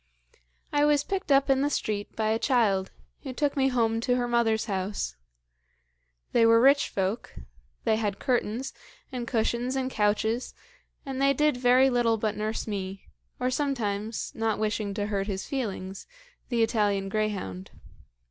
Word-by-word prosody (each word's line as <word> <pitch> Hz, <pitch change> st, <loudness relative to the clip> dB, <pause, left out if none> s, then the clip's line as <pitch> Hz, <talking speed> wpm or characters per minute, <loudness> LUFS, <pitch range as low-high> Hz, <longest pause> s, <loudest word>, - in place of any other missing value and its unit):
"I 290 Hz, 0 st, +3 dB
was 295 Hz, -1 st, +4 dB
picked 390 Hz, -4 st, -3 dB
up 275 Hz, 0 st, +5 dB
in 270 Hz, -1 st, +3 dB
the 285 Hz, -, +2 dB
street 210 Hz, -7 st, -3 dB
by 215 Hz, -1 st, 0 dB
a 220 Hz, +1 st, +1 dB
child, 215 Hz, -8 st, +2 dB, 0.3 s
who 265 Hz, -3 st, -6 dB
took 285 Hz, +2 st, 0 dB
me 270 Hz, -1 st, +3 dB
home 230 Hz, -3 st, +1 dB
to 245 Hz, +1 st, +1 dB
her 245 Hz, -1 st, 0 dB
mother's 235 Hz, -2 st, +2 dB
house. 190 Hz, -, -3 dB, 1.2 s
They 235 Hz, -, +4 dB
were 230 Hz, 0 st, +6 dB
rich 275 Hz, +3 st, +5 dB
folk; 195 Hz, +4 st, -2 dB, 0.5 s
they 220 Hz, -, +2 dB
had 205 Hz, -3 st, -1 dB
curtains, 245 Hz, -1 st, -1 dB, 0.4 s
and 245 Hz, -2 st, -4 dB
cushions, 240 Hz, +2 st, 0 dB
and 260 Hz, -1 st, -1 dB
couches, 220 Hz, +3 st, 0 dB, 0.5 s
and 270 Hz, -1 st, -4 dB
they 275 Hz, 0 st, +4 dB
did 300 Hz, +1 st, +2 dB
very 250 Hz, +2 st, +4 dB
little 235 Hz, -2 st, +2 dB
but 215 Hz, -1 st, -1 dB
nurse 215 Hz, +1 st, -2 dB
me, 195 Hz, -2 st, -5 dB, 0.3 s
or 250 Hz, +1 st, 0 dB
sometimes, 225 Hz, -6 st, -2 dB
not 225 Hz, -1 st, 0 dB
wishing 210 Hz, -2 st, -1 dB
to 205 Hz, -1 st, -1 dB
hurt 200 Hz, -1 st, -2 dB
his 195 Hz, -2 st, -3 dB
feelings, 195 Hz, -8 st, -4 dB, 0.4 s
the 235 Hz, -3 st, +2 dB
Italian 205 Hz, -3 st, +1 dB
greyhound. 195 Hz, -, -3 dB
225 Hz, 155 wpm, -27 LUFS, 210-260 Hz, 1.2 s, were